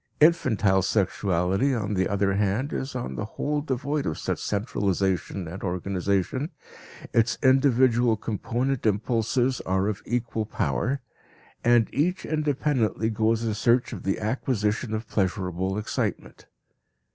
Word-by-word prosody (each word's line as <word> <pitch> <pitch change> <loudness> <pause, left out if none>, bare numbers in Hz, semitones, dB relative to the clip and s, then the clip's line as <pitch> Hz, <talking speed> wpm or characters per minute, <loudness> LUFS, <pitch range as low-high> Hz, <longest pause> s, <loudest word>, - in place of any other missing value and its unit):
Infantile 110 - +4
sexuality, 95 +4 +1
on 105 -2 -2
the 95 -1 +1
other 100 -1 +1
hand, 105 +7 0
is 130 0 -4
on 125 - -3
the - - -3
whole 150 0 0
devoid 140 +1 -2
of 80 - -2
such - - -2
centralization 95 -4 -1
and 85 +5 -7
organization, 95 - -1 0.6
its 115 +1 +2
individual 130 -3 +4
component 120 +5 -2
impulses 115 +4 +1
are 95 +1 +1
of 105 -2 -2
equal 115 -3 -1
power, 135 +4 -1 0.6
and 120 -2 +4
each 180 +6 0
independently 145 -7 0
goes 110 +1 +1
in 110 -2 0
search 120 +5 +2
of 100 - -6
the 95 - -1
acquisition 110 -1 -1
of 110 +1 -5
pleasurable 95 -1 -1
excitement. 105 - -3
110 Hz, 125 wpm, -26 LUFS, 100-130 Hz, 0.6 s, Infantile